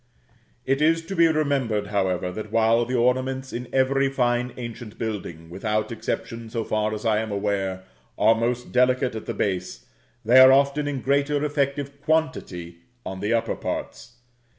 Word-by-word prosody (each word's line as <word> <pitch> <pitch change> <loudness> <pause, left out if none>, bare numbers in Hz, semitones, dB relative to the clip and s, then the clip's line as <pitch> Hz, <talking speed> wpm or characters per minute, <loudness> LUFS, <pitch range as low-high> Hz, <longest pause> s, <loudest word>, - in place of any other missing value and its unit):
It 135 +2 +1
is 165 +1 +3
to 195 - -5
be 170 -1 +5
remembered, 140 -9 0
however, 95 -3 0
that 110 +2 -7
while 115 +1 +3
the 125 +2 -2
ornaments 130 +2 0
in 125 +1 -5
every 135 +1 +2
fine 125 -2 0
ancient 120 -2 -8
building, 90 -7 -5
without 105 +3 -2
exception 115 -1 -4
so 115 0 -2
far 110 0 -1
as 105 - -7
I 110 -1 +3
am 110 0 -3
aware, 100 -2 -2 0.3
are 110 +2 +5
most 120 +2 -2
delicate 125 0 +2
at 110 - -7
the 115 - -3
base, 90 -12 -3 0.4
they 120 +4 +7
are 130 0 +9
often 140 +2 +3
in 140 -3 -3
greater 140 +2 +1
effective 140 -1 -2
quantity 150 - -2 0.3
on 95 0 -5
the 105 +3 -2
upper 115 - 0
parts. 115 +2 -5
120 Hz, 165 wpm, -24 LUFS, 105-135 Hz, 0.4 s, are